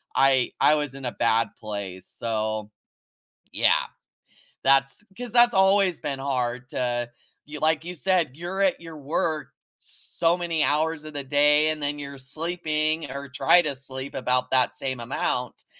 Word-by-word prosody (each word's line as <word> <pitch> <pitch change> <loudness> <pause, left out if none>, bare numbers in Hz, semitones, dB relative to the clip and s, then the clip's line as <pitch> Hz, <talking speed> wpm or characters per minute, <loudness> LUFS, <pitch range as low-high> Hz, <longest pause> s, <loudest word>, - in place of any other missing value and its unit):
I 135 -2 +3
I 150 - +5
was 145 -3 -2
in 135 -1 -8
a 125 - -1
bad 115 0 +1
place, 100 -4 -6
so, 110 -2 -3 0.8
yeah, - - +2 0.8
that's 135 +6 +4
'cause 245 -1 -7
that's 240 +1 +5
always 190 -1 +4
been 140 -2 -4
hard 125 -2 -2
to 120 -2 -1 0.4
y 150 +1 -8
like 160 0 +1
you 180 - -6
said, 175 -3 0
you're 175 +4 -3
at 190 -3 +1
your 165 -2 -10
work 155 +2 -2 0.4
so 170 +1 0
many 170 -3 -1
hours 155 +1 +1
of 155 - -8
the 145 -1 -3
day 150 +2 +4
and 155 -1 -3
then 145 0 -2
you're 140 -1 -7
sleeping 155 +2 -1
or 140 +1 -5
try 145 +6 +4
to 150 -4 -2
sleep 130 +1 -7
about 125 0 +3
that 130 -2 +4
same 130 -2 -3
amount 125 0 -3
145 Hz, 160 wpm, -24 LUFS, 130-160 Hz, 0.8 s, I